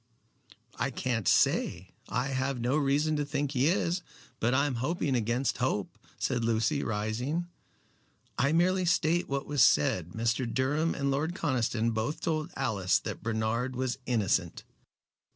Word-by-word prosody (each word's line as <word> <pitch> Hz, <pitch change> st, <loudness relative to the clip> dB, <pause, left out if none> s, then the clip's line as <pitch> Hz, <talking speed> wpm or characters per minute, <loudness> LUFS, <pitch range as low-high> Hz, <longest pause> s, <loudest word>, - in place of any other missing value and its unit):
"I 130 Hz, -, 0 dB
can't 120 Hz, -4 st, -2 dB
say. 90 Hz, +2 st, +2 dB, 0.2 s
I 125 Hz, +2 st, -1 dB
have 130 Hz, -1 st, -1 dB
no 120 Hz, +4 st, 0 dB
reason 150 Hz, +1 st, +2 dB
to 145 Hz, -, 0 dB
think 145 Hz, -1 st, -2 dB
he 135 Hz, 0 st, +2 dB
is. 175 Hz, 0 st, +1 dB, 0.4 s
But 120 Hz, +3 st, +2 dB
I 140 Hz, +2 st, +3 dB
am 145 Hz, -, -1 dB
hoping 150 Hz, 0 st, 0 dB
against 120 Hz, +2 st, 0 dB
hope," 125 Hz, -6 st, -1 dB, 0.2 s
said 120 Hz, -2 st, -1 dB
Lucy, 115 Hz, +5 st, +1 dB
rising. 115 Hz, +10 st, -2 dB, 0.9 s
"I 140 Hz, +4 st, +2 dB
merely 180 Hz, +3 st, +2 dB
state 170 Hz, 0 st, +2 dB
what 140 Hz, 0 st, -2 dB
was 145 Hz, -2 st, 0 dB
said. 85 Hz, 0 st, +3 dB
Mr. 115 Hz, +1 st, 0 dB
Durham 145 Hz, +7 st, 0 dB
and 140 Hz, 0 st, 0 dB
Lord 155 Hz, +6 st, -1 dB
Conniston 120 Hz, -7 st, 0 dB
both 110 Hz, +7 st, -2 dB
told 155 Hz, -1 st, -1 dB
Alice 105 Hz, -9 st, +1 dB
that -, -, -6 dB
Bernard 115 Hz, +3 st, -1 dB
was 130 Hz, 0 st, -2 dB
innocent." 100 Hz, -7 st, 0 dB
130 Hz, 150 wpm, -29 LUFS, 115-145 Hz, 0.9 s, I